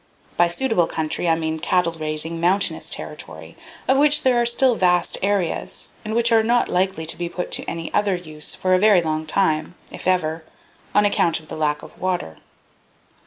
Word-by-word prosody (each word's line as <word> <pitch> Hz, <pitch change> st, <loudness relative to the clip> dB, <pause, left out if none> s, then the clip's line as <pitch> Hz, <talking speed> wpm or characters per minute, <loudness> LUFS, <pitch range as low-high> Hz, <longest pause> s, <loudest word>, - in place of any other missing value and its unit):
By 175 Hz, -, +4 dB
suitable 180 Hz, -1 st, +1 dB
country 160 Hz, +2 st, -2 dB
I 165 Hz, -, +4 dB
mean 160 Hz, -1 st, -3 dB
cattle 180 Hz, 0 st, +1 dB
raising, 155 Hz, +1 st, -2 dB
mountainous 190 Hz, +3 st, +1 dB
territory, -, -, -6 dB, 0.3 s
of 265 Hz, +1 st, +3 dB
which 295 Hz, +1 st, +4 dB
there 250 Hz, -2 st, +3 dB
are 235 Hz, -, +2 dB
still 245 Hz, +2 st, +4 dB
vast 180 Hz, -4 st, +2 dB
areas, 195 Hz, -3 st, -2 dB
and 215 Hz, +1 st, -4 dB
which 235 Hz, 0 st, +2 dB
are 225 Hz, -1 st, +5 dB
not 240 Hz, +2 st, +2 dB
likely 185 Hz, -2 st, -1 dB
to 160 Hz, -, -1 dB
be 175 Hz, -1 st, -4 dB
put 180 Hz, +1 st, -5 dB
to -, -, -2 dB
any 165 Hz, -1 st, -6 dB
other 205 Hz, -2 st, +2 dB
use 155 Hz, -4 st, -5 dB
for 185 Hz, 0 st, 0 dB
a 185 Hz, -, +4 dB
very 205 Hz, -3 st, +5 dB
long 155 Hz, 0 st, -2 dB
time, 155 Hz, -2 st, 0 dB, 0.2 s
if -, -, -7 dB
ever, 165 Hz, -3 st, 0 dB, 0.5 s
on 205 Hz, 0 st, +5 dB
account 170 Hz, -5 st, +2 dB
of 155 Hz, -, -18 dB
the -, -, -5 dB
lack 150 Hz, -1 st, -1 dB
of -, -, -13 dB
water. 180 Hz, -, -2 dB
180 Hz, 190 wpm, -21 LUFS, 160-205 Hz, 0.5 s, are